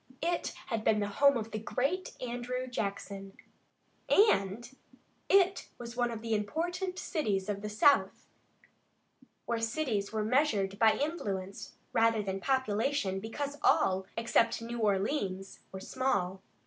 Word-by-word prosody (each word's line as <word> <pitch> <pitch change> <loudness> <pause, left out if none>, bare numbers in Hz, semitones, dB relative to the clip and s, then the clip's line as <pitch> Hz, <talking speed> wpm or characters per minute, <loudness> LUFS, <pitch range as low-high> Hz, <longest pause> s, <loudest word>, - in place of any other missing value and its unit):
It 345 +1 -1
had 225 -3 -2
been 215 -1 +3
the 205 - 0
home 280 +6 +4
of 225 0 -5
the 215 - -3
great 275 - -2
Andrew 250 +1 -3
Jackson, 200 -4 -5 0.7
and 225 - +3 0.6
it 385 -1 +3
was 235 0 -8
one 240 -1 +1
of 230 -1 -6
the 225 -1 -1
important 350 - -2
cities 210 - -1
of 200 -1 -2
the 210 - -4
South, 245 +7 +3 1.2
where 235 -1 -1
cities 225 -4 -1
were 215 -1 -1
measured 215 -6 +1
by 220 -1 +6
influence 200 - -4 0.2
rather 225 -1 +3
than 195 -1 -3
population, 260 -4 0
because 285 +7 -5
all, 190 0 +3
except 230 0 +2
New 235 +1 -5
Orleans, 195 -2 -1
were 190 - -6
small. 190 -6 -1
225 Hz, 135 wpm, -31 LUFS, 200-270 Hz, 1.2 s, by